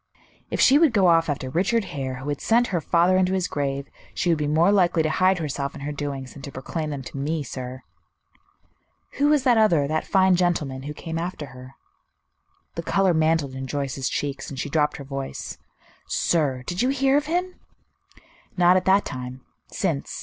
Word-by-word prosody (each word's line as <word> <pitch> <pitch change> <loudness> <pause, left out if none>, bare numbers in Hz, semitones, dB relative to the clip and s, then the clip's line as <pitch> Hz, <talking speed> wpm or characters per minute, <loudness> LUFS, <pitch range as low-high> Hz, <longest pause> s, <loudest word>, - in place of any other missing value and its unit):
"If - - -3
she 275 +3 +6
would 315 -7 +4
go 200 -4 +4
off 165 -2 +4
after 140 -2 -2
Richard 195 - +1
Hare, 130 -2 -3
who 135 +3 -6
had 145 - -3
sent 240 +2 +3
her 170 - +1
father 175 +4 +3
into 185 0 +2
his 185 -2 0
grave, 140 -1 -3 0.3
she 175 - 0
would 165 -2 +2
be 150 - -1
more 160 +6 +3
likely 175 -5 +3
to 155 - 0
hide 185 +2 +3
herself 140 -3 -3
and 140 - -8
her 150 - -3
doings 140 -3 -5
than 140 - -11
to 140 - -8
proclaim 155 +4 -4
them 140 -3 -5
to 135 - -9
me, 150 +3 -2
sir." 130 0 -7 1.4
"Who 285 - +4
was 295 -3 +3
that 245 -4 +4
other, 170 -10 +3
that 155 +2 -2
fine 190 -1 +4
gentleman, 160 -7 0
who 145 +2 -6
came 165 +1 -5
after 170 -3 -4
her?" 130 +1 -12 1.0
The 170 - -4
color 190 +1 +2
mantled 160 -3 +1
in 130 0 -5
Joyce's 135 -2 -2
cheeks, 140 -1 -3
and 140 - -8
she 145 - -4
dropped 150 -2 +1
her 140 - -8
voice. 135 0 -6 0.5
"Sir! 140 -7 0
Did 175 +5 -2
you 250 - +2
hear 270 0 +2
of 295 +1 +1
him?" 360 +3 -2 1.0
"Not 180 +1 +5
at 185 - -1
that 195 +2 +4
time. 125 0 -6 0.3
Since. 70 - -3
155 Hz, 200 wpm, -24 LUFS, 140-185 Hz, 1.4 s, she